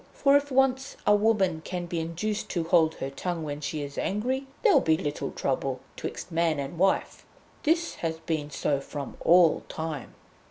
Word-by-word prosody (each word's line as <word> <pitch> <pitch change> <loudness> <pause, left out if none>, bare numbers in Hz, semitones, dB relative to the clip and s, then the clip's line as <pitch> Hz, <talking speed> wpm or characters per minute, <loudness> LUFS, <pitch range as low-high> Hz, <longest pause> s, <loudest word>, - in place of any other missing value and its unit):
For 275 0 +4
if 285 0 +2
once 265 0 +2
a 205 - +6
woman 200 -6 +2
can 180 0 -4
be 170 -1 -3
induced 170 +6 -3
to 170 - -1
hold 160 -1 +3
her 135 - -4
tongue 170 +3 -3
when 145 -1 -5
she 150 0 -3
is 140 0 -6
angry, 255 +7 -1 0.2
there'll 430 -6 +6
be 160 -1 +3
little 145 -1 -3
trouble 135 -1 -2 0.2
'twixt - - -6
man 165 -2 +1
and 140 +4 -5
wife. 190 +1 +1 0.4
This 330 +2 +1
has 160 -1 -1
been 160 -2 -3
so 145 -1 0
from 140 -1 -6
all 170 -1 +6
time." 160 -4 -5
165 Hz, 175 wpm, -27 LUFS, 155-210 Hz, 0.4 s, a